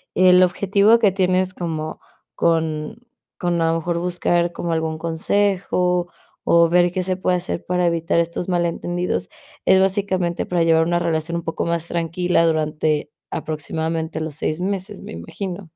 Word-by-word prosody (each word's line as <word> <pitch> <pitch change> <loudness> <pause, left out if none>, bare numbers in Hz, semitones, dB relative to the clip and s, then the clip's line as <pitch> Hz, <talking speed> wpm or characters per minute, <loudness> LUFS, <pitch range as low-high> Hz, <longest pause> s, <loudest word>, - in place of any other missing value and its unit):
el 185 0 +6
objetivo 200 +5 +3
que 205 -4 +4
tienes 185 0 +1
como 160 -2 -4 0.4
con 160 +2 0 0.4
con 175 -2 0
a 165 0 +2
lo 165 - +1
mejor 170 +1 -2
buscar 175 -1 0
como 170 0 -3
algún 160 -1 -1
consejo 180 +1 0 0.4
o 170 0 +5
ver 175 +1 +4
qué 185 0 -2
se 185 0 -1
puede 185 -1 +1
hacer 175 -1 -4
para 180 0 +1
evitar 165 0 +1
estos 170 +2 -2
malentendidos, 175 - -1 0.4
es 190 0 +5
básicamente 190 -3 0
para 175 -2 +1
llevar 165 0 +4
una 175 +1 +1
relación 165 0 -1
un 170 - -5
poco 165 - -3
más 170 0 -2
tranquila 170 +1 +1
durante 155 -1 0 0.2
aproximadamente 160 +1 -3
los 155 -2 -4
6 155 +1 -2
meses, 195 +1 -3
me - - -9
imagino. 180 - -6
170 Hz, 155 wpm, -21 LUFS, 165-180 Hz, 0.4 s, el